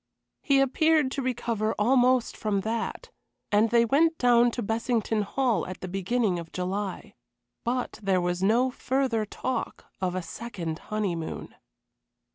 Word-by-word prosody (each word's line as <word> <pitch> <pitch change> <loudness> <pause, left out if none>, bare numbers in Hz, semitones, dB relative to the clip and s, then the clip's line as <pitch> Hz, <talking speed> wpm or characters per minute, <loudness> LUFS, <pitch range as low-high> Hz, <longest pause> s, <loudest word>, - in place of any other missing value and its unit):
He 275 -2 +3
appeared 295 +1 +3
to 275 - -2
recover 230 -4 -1
almost 250 +2 +3
from 205 -2 -1
that, 230 - -3 0.4
and 210 +2 +4
they 235 0 +4
went 320 +7 +3
down 240 -1 +5
to 240 0 -4
Bessington 225 0 0
Hall 235 +1 0
at 185 - -7
the 185 - -4
beginning 195 +1 0
of 165 -1 -9
July. 190 +2 -4 0.5
But 250 +1 -2
there 195 -2 +2
was 175 0 -1
no 235 +6 +3
further 250 -4 0
talk 255 +4 -4 0.2
of 180 -1 -1
a 185 - -2
second 170 -4 -5
honeymoon. 190 -7 -3
225 Hz, 140 wpm, -27 LUFS, 195-255 Hz, 0.5 s, down